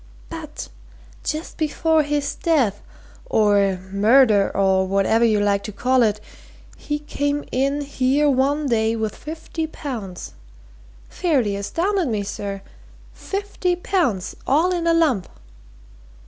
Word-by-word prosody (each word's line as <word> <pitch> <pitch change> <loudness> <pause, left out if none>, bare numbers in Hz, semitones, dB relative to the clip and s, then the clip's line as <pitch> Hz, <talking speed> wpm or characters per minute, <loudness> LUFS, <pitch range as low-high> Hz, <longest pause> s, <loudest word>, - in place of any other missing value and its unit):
But, 320 -2 -7 0.5
just 310 +2 -4
before 320 0 +2
his 290 -1 -1
death, 265 - +1 0.5
or 200 -3 +3
murder, 210 0 +4
or 190 -1 +3
whatever 200 +4 +2
you 220 -3 +3
like 200 -1 +2
to 215 - -5
call 255 +5 +2
it, 215 -2 +2 0.6
he 295 - -3
came 290 -1 -2
in 275 +3 0
here 280 +1 +1
one 285 +2 +2
day 225 -3 +1
with 220 -2 -3
fifty 320 +1 -5
pounds! 230 - -7 0.7
Fairly 265 - 0
astounded 340 - -1
me, 215 -4 -1
sir! 200 0 -5 0.5
Fifty 395 -2 -2
pounds 345 - -1
all 320 +7 +3
in 340 -1 -1
a 335 - +4
lump!" 275 - +2
265 Hz, 120 wpm, -22 LUFS, 205-310 Hz, 0.7 s, murder